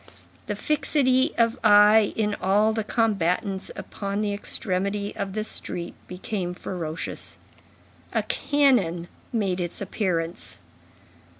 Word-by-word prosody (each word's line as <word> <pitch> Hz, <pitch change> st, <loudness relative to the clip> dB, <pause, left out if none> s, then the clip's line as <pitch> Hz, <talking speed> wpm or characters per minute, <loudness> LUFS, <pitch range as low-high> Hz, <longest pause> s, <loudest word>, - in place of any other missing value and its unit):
The -, -, -1 dB
fixity 280 Hz, -2 st, +2 dB
of 230 Hz, 0 st, +2 dB
eye 210 Hz, 0 st, +7 dB
in 210 Hz, -2 st, +1 dB
all 205 Hz, +4 st, +3 dB
the 220 Hz, 0 st, -1 dB
combatants 200 Hz, -3 st, 0 dB
upon 200 Hz, 0 st, -4 dB
the 205 Hz, -1 st, 0 dB
extremity 200 Hz, 0 st, -2 dB
of 195 Hz, -1 st, -3 dB
the 215 Hz, +1 st, -1 dB
street 175 Hz, -5 st, -4 dB
became 180 Hz, -1 st, -4 dB
ferocious. 165 Hz, -3 st, -5 dB, 0.7 s
A -, -, +1 dB
cannon 235 Hz, -, +2 dB, 0.2 s
made 195 Hz, -6 st, 0 dB
its 175 Hz, -1 st, -4 dB
appearance. 180 Hz, -4 st, -2 dB
205 Hz, 110 wpm, -25 LUFS, 180-220 Hz, 0.7 s, eye